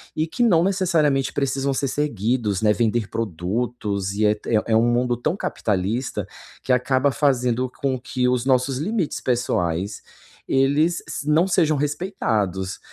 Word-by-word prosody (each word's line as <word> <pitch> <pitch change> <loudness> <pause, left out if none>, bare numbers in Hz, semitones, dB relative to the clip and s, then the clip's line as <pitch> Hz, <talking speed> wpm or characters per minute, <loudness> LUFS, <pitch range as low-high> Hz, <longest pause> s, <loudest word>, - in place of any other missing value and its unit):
e 155 - +1
que 165 - -5
não 180 -9 +4
necessariamente 170 -8 +1
precisam 140 0 0
ser 135 0 -1
seguidos, 115 -6 -1
né, 105 -1 +4
vender 115 -1 0
produtos 105 0 -2
e 105 +2 +1
é 105 - +4
te 110 +1 -3
é 105 - +4
é 110 - +2
um 120 +1 +3
mundo 120 -1 +1
tão 155 +8 -1
capitalista 110 - -2 0.4
que 130 - -1
acaba 130 +2 +2
fazendo 125 -3 +1
com 130 -2 0
que 125 +1 -1
os 125 0 0
nossos 130 0 +2
limites 185 +1 -2
pessoais, 100 -6 -1 0.5
eles 145 +6 +2
se 145 - -4
não 160 +5 +4
sejam 160 -4 +3
respeitados, 115 - -2
125 Hz, 155 wpm, -22 LUFS, 110-145 Hz, 0.5 s, não